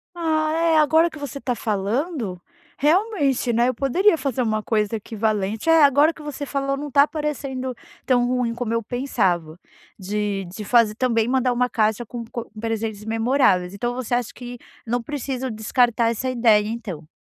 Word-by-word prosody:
Ah, 315 -2 0
eh, 330 -1 +3
agora 315 +3 +4
que 310 - -11
você 285 -2 -6
tá 250 -2 -2
falando 220 - -2 0.4
realmente, 295 - +2
né, 235 +2 +2
eu - - 0
poderia 330 - +3
fazer 265 -3 -1
uma 215 -2 0
coisa 215 0 0
equivalente. 215 +1 -2
Eh, 325 -1 +6
agora 285 +3 +5
que 315 - -13
você 295 -1 -5
falou, 275 0 -2
não 290 +1 -6
tá 280 +2 +5
parecendo 275 -4 -3 0.3
tão 245 -2 +3
ruim 250 -2 0
como 235 -1 -4
eu 230 0 0
pensava, 190 - -1 0.4
de 200 0 -2
de 185 +5 -8
fazer 230 0 +3
também 230 -2 +1
mandar 255 0 +1
uma 250 +1 +1
caixa 220 +1 0
com 235 +1 -7
co 235 +1 -7
presentes 220 -2 -3
memoráveis. 225 -5 +2
Então, 240 +4 -2
você 255 -1 -4
acha 245 -2 0
que 245 0 -8 0.3
não 240 +1 -1
preciso 265 -1 -4
descartar 230 +1 +1
essa 255 +3 -2
ideia, 225 -4 +3
então? 210 -9 -6
245 Hz, 170 wpm, -22 LUFS, 220-275 Hz, 0.4 s, Eh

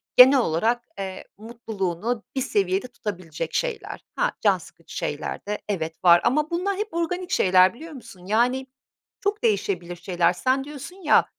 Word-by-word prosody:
genel 260 +2 +9
olarak, 230 +5 +1 0.2
eee, 190 -1 -5
mutluluğunu 220 -1 -3
bir 265 - 0
seviyede 195 0 0
tutabilecek 180 -9 -6
şeyler. - - -3
Ha, - - +1
can - - +4
sıkıcı - - -14
şeyler - - -4
de, 210 0 -3
evet, 165 -5 -3
var 175 -1 +7
ama 300 +6 +2
bunlar 375 +3 -1
hep 425 -1 -4
organik 355 +2 -2
şeyler, 185 - +5
biliyor 320 +7 -10
musun? 190 -9 -12
Yani 245 +6 +1 0.6
çok 410 +1 -1
değişebilir 190 -5 0
şeyler. 175 0 +1
Sen 260 +7 +1
diyorsun 295 +5 -9
ya, 300 - +5
230 Hz, 155 wpm, -24 LUFS, 185-280 Hz, 0.6 s, genel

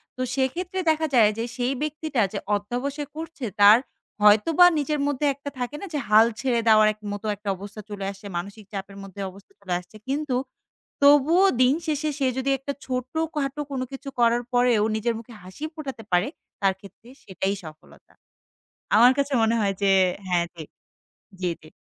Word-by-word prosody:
তো 255 - -6
সেক্ষেত্রে 345 +8 -1
দেখা 315 0 +2
যায় 215 -3 +6
যে, 230 - -1
সেই 250 +1 0
ব্যক্তিটা 305 -4 -1
যে, 200 - -2 0.2
অধ্যবসায় 265 +8 -3
করছে, 320 -5 -6 0.2
তার 205 +3 +9 0.5
হয়তোবা 290 +12 +6
নিজের 295 +1 -1
মধ্যে 290 0 -1
একটা 285 +1 -7
থাকে 245 +4 -3
না - - -5
যে, 295 - 0
হাল 215 +1 +7
ছেড়ে 250 -3 +1
দেওয়ার 215 -1 +6 0.2
মতো 205 +1 -7
একটা 205 0 -6
অবস্থা 205 +2 -9
চলে 200 -2 -5
আসছে। 195 +1 -14
মানসিক 200 +4 -7
চাপের 195 0 -6
মধ্যে 195 +1 -9
অবস্থা 200 - -18
চলে 180 - -4
আসছে। 180 +4 -17
কিন্তু 280 -1 -1 0.7
তবুও 295 +7 +6 0.2
দিন 255 +2 +5
শেষে, 305 0 0
সে 270 - +2
যদি 265 +1 -1
একটা 280 +2 -5
ছোটখাটো 275 +3 -2
কোনো 260 -1 -2
কিছু 275 +1 -7
করার 235 +1 +3
পরেও 245 -3 +3
নিজের 230 +2 0
মুখে 230 +1 -13
হাসি 185 +10 -11
ফোটাতে 270 -7 -7
পারে, 180 +5 +3 0.3
তার 195 -1 +3
ক্ষেত্রে 200 +4 -16 0.2
সেটাই 190 +1 -2
সফলতা। 155 -1 -14 0.8
আমার 245 +3 +7
কাছে 280 0 0
মনে 225 +1 +3
হয় 200 -2 +1
যে 195 - +4 0.4
হ্যাঁ, 175 -1 +2
জ্বি, 165 -2 -9 1.0
জ্বি। 155 - -16
245 Hz, 170 wpm, -24 LUFS, 205-285 Hz, 1.0 s, তার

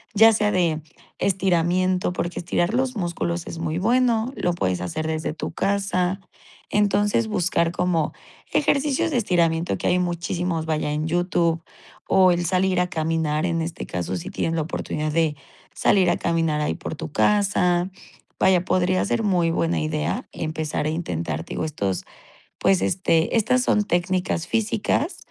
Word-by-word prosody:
ya 225 +2 +8
sea 210 -1 +1
de 165 -5 +1 0.4
estiramiento 185 -1 +1
porque 175 -1 -3
estirar 175 +3 0
los 260 0 0
músculos 170 -1 -2
es - - -6
muy 165 +1 -2
bueno, 235 +2 +2
lo 175 - 0
puedes 90 - -1
hacer 155 - -3
desde 155 -1 -2
tu 155 - -5
casa, 195 -1 0 0.5
entonces, 205 +2 +2
buscar 175 -4 +1
como 175 -3 0 0.4
ejercicios 290 +1 +1
de 260 - +1
estiramiento 170 -6 +1
que - - -2
hay 180 0 +3
muchísimos, 175 -1 -2
vaya, 155 -2 -1
en 150 +2 -1
YouTube 170 -1 +1 0.4
o 185 -1 +5
el 175 0 0
salir 185 +1 +1
a 180 - +2
caminar, 160 -1 0
en 165 -2 0
este 165 0 -5
caso 90 +1 -3
si 85 - -6
tienes 165 - -1
la 160 - 0
oportunidad 155 -1 -3
de 160 -2 +1 0.4
salir 185 -3 +3
a - - +2
caminar 165 -3 0
ahí 150 - 0
por - - -6
tu 150 - -7
casa, 185 -2 +2 0.5
vaya, 185 -2 +3
podría 185 0 +2
ser 225 - 0
muy 180 -5 +2
buena 165 0 0
idea 155 -1 -2
empezar 155 -1 -3
a - - +1
intentar, 85 - -3
digo, - - -4
estos, 100 - -2 0.6
pues, 190 -2 +3
este, 165 0 +1
estas 250 +3 +2
son 210 -4 +2
técnicas 180 -1 0
físicas 225 - 0
175 Hz, 155 wpm, -23 LUFS, 160-190 Hz, 0.6 s, ya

